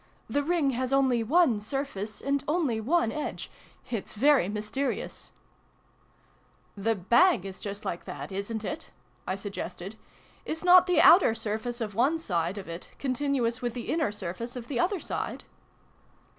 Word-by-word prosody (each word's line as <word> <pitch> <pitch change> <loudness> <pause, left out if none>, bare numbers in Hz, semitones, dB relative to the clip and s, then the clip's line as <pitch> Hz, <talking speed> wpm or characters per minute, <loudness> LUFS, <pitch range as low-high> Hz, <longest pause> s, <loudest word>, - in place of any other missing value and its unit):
" - - -37
The 285 - +4
Ring 310 -2 +1
has 255 +1 -2
only 265 -3 +3
one 260 -1 +3
surface, 215 -3 -4
and 280 0 0
only 295 -8 +1
one 265 -1 +2
edge. 300 - -5 0.4
It's 220 -3 -4
very 270 -3 +4
mysterious! 215 +7 -3 0.5
" - - -36
" - - -36
The 225 0 +3
bag 235 - +4
is 190 -1 -6
just 205 0 -6
like 170 - -4
that, - - -7
isn't 210 +3 -4
it? 185 - -5 0.2
" 120 0 -36
I 185 - 0
sug 195 +1 -6
gested. 195 +2 -6 0.5
"Is 320 +2 -4
not 365 0 +7
the 360 - +4
outer 330 - +7
surface 225 +2 -2
of 210 -2 -3
one 265 +10 +2
side 180 - -1
of 195 - -7
it 170 +2 -7
continuous 255 -3 0
with 240 -1 -2
the 240 - -4
inner 315 -8 +1
surface 210 +4 -4
of 245 -1 -7
the 255 -4 -1
other 375 +5 +1
side - - -4
235 Hz, 170 wpm, -28 LUFS, 205-280 Hz, 0.5 s, not